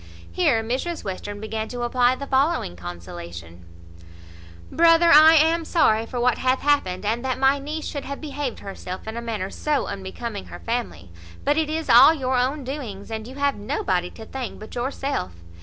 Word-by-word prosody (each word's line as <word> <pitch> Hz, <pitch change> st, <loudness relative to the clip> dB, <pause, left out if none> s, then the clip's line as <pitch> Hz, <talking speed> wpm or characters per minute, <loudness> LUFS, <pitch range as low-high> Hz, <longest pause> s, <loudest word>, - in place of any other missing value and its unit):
Here 285 Hz, -11 st, +2 dB
Mrs 265 Hz, +9 st, -3 dB
Western 205 Hz, +1 st, -5 dB
began 220 Hz, +1 st, -4 dB
to 245 Hz, -1 st, -5 dB
apply 245 Hz, +1 st, +2 dB
the 280 Hz, -, -6 dB
following 270 Hz, -, +1 dB
consolation: 85 Hz, -1 st, -9 dB, 1.1 s
"Brother, 335 Hz, +1 st, +5 dB
I 310 Hz, +2 st, +9 dB
am 325 Hz, +2 st, +4 dB
sorry 225 Hz, -10 st, +2 dB
for 245 Hz, -, -4 dB
what 245 Hz, 0 st, +2 dB
hath 255 Hz, 0 st, +1 dB
happened; 205 Hz, -10 st, +1 dB
and 230 Hz, +4 st, -1 dB
that 260 Hz, -1 st, -1 dB
my 270 Hz, +1 st, +3 dB
niece 300 Hz, +3 st, -5 dB
should 285 Hz, -, -5 dB
have 280 Hz, 0 st, -6 dB
behaved 290 Hz, -4 st, -5 dB
herself 190 Hz, 0 st, -7 dB
in 220 Hz, -, -5 dB
a 235 Hz, -, -4 dB
manner 215 Hz, -5 st, -4 dB
so 295 Hz, -3 st, -1 dB
unbecoming 200 Hz, +2 st, -6 dB
her -, -, -9 dB
family; 230 Hz, -, -4 dB, 0.3 s
but 290 Hz, -, +3 dB
it 315 Hz, -1 st, 0 dB
is 320 Hz, +1 st, -3 dB
all 320 Hz, -, +8 dB
your 260 Hz, -3 st, -1 dB
own 265 Hz, +4 st, 0 dB
doings, 245 Hz, -7 st, -6 dB
and 220 Hz, 0 st, -5 dB
you 260 Hz, -, -10 dB
have 285 Hz, 0 st, +1 dB
nobody 190 Hz, -6 st, -1 dB
to 220 Hz, -, -11 dB
thank 255 Hz, 0 st, -6 dB
but 215 Hz, -, -11 dB
yourself. 255 Hz, -, -3 dB
250 Hz, 180 wpm, -23 LUFS, 210-285 Hz, 1.1 s, I